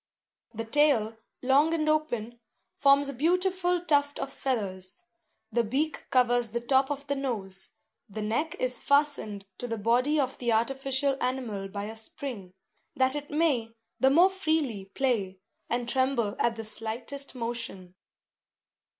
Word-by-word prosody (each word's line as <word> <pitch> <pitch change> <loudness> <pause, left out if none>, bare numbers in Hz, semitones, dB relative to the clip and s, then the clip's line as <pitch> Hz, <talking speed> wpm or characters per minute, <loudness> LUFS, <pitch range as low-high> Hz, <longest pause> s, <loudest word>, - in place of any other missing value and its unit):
The 225 +1 -3
tail, 230 -4 +3 0.3
long 285 +5 +4
and 310 -1 -1
open, 240 -7 0 0.4
forms 280 0 +4
a - - -4
beautiful 355 +4 +1
tuft 285 -2 +2
of 275 - -5
feathers. 205 - -3 0.5
The 235 +2 +2
beak 280 +8 -2
covers 245 -2 +3
the 235 +2 -2
top 265 +3 +2
of 285 -1 -4
the 280 0 -1
nose; 210 -9 -3 0.4
the 210 +2 -5
neck 265 +10 -1
is 255 0 -1
fastened 280 -9 +1
to 245 - -4
the 230 -1 -3
body 245 +8 +2
of 265 -2 -1
the 240 -2 +1
artificial 270 +3 +1
animal 245 -6 -2
by 200 +1 -5
a 220 +2 -6
spring, 220 -3 -6 0.4
that 260 +1 +2
it 290 0 -5
may 295 -7 +1 0.3
the 265 - +5
more 345 +7 +6
freely 315 - -1
play, 200 -3 -1 0.3
and 240 0 -1
tremble 260 -4 +1
at 235 -1 +2
the 225 -1 -6
slightest 235 +6 0
motion. 230 -7 -4
255 Hz, 145 wpm, -28 LUFS, 225-285 Hz, 0.5 s, more